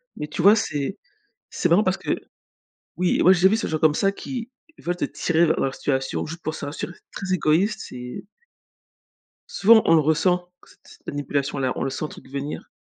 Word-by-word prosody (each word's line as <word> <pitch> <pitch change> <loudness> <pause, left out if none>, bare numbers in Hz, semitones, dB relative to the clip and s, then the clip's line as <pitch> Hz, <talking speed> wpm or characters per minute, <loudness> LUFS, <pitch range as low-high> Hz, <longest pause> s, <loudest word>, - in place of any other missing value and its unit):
Mais 150 - -5
tu 150 - -4
vois? 200 +5 +7
C'est 145 -4 -2 0.5
c'est 175 - -1
marrant 175 +6 +5
parce 185 -1 +1
que - - -4 0.9
oui 180 0 +1
moi, 185 - +7
j'ai 180 - +2
déjà 190 - +7
vu 220 - +3
ces 225 - -2
gens 155 - -1
comme 155 -1 +3
ça 195 +5 +2
qui 245 +2 -6 0.3
veulent 175 +1 -3
te - - -2
tirer 170 0 +1
vers 155 - +1
leur 135 0 -1
situation, 135 -2 -2
juste 165 +2 -8
pour 155 0 -3
se - - -6
rassurer. 155 +4 -5
C'est - - -27
très 185 - 0
égoïste, 180 +5 +1
c'est 125 +5 -8 1.3
Souvent, 220 +2 +6
on 165 - +5
le 160 - +6
ressent. 175 +4 +1 0.2
C - - -19
cette - - -19
manipulation-là, 140 -2 -2
on - - -4
le - - -1
sent, 135 +4 -4
truc 130 - -13
venir. 140 +2 -5
165 Hz, 205 wpm, -23 LUFS, 145-185 Hz, 1.3 s, vois